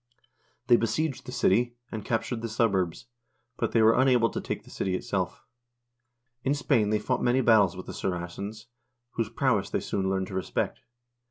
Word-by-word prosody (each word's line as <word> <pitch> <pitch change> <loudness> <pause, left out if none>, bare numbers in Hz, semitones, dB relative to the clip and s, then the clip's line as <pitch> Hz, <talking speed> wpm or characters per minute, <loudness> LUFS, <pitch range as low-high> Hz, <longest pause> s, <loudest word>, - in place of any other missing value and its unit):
They 120 - +6
besieged 130 +6 -1
the - - -5
city, 120 0 +2 0.2
and 110 -2 -5
captured 115 +1 -2
the 115 - -3
suburbs, 100 -4 0 0.5
but - - -1
they 115 - +4
were 110 +1 +6
unable 125 -4 +4
to - - -3
take - - -4
the - - -16
city 95 -1 -1
itself. 90 -1 -3 1.0
In 135 +2 +1
Spain 125 -7 +2
they 105 - +2
fought 125 +4 -1
many 125 +2 +3
battles 105 -7 +4
with 95 - -7
the - - -7
Saracens, 95 +4 -4 0.5
whose 115 -2 -2
prowess 115 -5 +1
they - - 0
soon 95 -1 -2
learned 95 0 0
to - - -8
respect. 95 -1 -2
110 Hz, 175 wpm, -27 LUFS, 95-120 Hz, 1.0 s, They